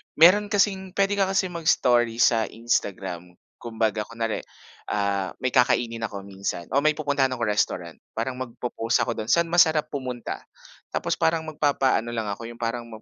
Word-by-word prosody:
Meron 185 +6 +6
kasing 195 -2 0
pwede 200 0 +2
ka 195 - +3
kasi 190 -1 0
mag-story 125 -9 +2
sa 115 -2 +3
Instagram. 95 -6 -3 0.2
Kumbaga 110 -2 -1
kunware, 115 -1 -3 0.5
ah, 100 -2 -1
may 130 - +1
kakainin 115 -2 +2
ako 100 -2 -8
minsan, 95 -3 -5
o 140 - +3
may 155 +1 +2
pupuntahan 145 -3 +1
ako 120 - -3
restaurant. 90 -5 -1 0.2
Parang 125 +3 -3
magpopost 120 -2 -2
ako - - -1
dun, 110 -1 -5
saan 170 +2 +3
masarap 160 -3 +4
pumunta. 130 -4 -4 0.5
Tapos - - -1
parang 160 0 +2
magpapaano 140 -6 +1
lang 115 -2 -2
ako 115 +3 -6
yung 120 0 -10
parang 120 0 -3
ano 115 - -10
120 Hz, 160 wpm, -25 LUFS, 110-155 Hz, 0.5 s, Meron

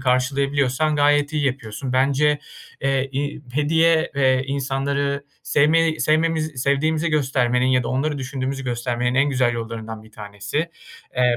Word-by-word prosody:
karşılayabiliyorsan 135 +3 +1
gayet 145 0 +3
iyi 150 -2 0
yapıyorsun. 130 0 -4
Bence, 140 +3 +2 0.4
eee, 135 0 0
i 145 +1 -3
hediye 160 +3 +2
ve 130 -1 +2
insanları 140 +1 -1 0.2
sevmeyi 160 +2 +2
sevmemiz 155 -3 +1
sevdiğimizi 155 +4 +1
göstermenin 130 -4 +1
ya 130 -1 +3
da 115 - -4
onları 145 +3 -1
düşündüğümüzü 135 0 -4
göstermenin 120 0 -1
en 135 +2 +3
güzel 125 -3 +2
yollarından 115 -1 -6
bir 110 0 -18
tanesi. 105 +3 -5 0.6
Eee, 125 -1 +3
135 Hz, 130 wpm, -22 LUFS, 125-145 Hz, 0.6 s, gayet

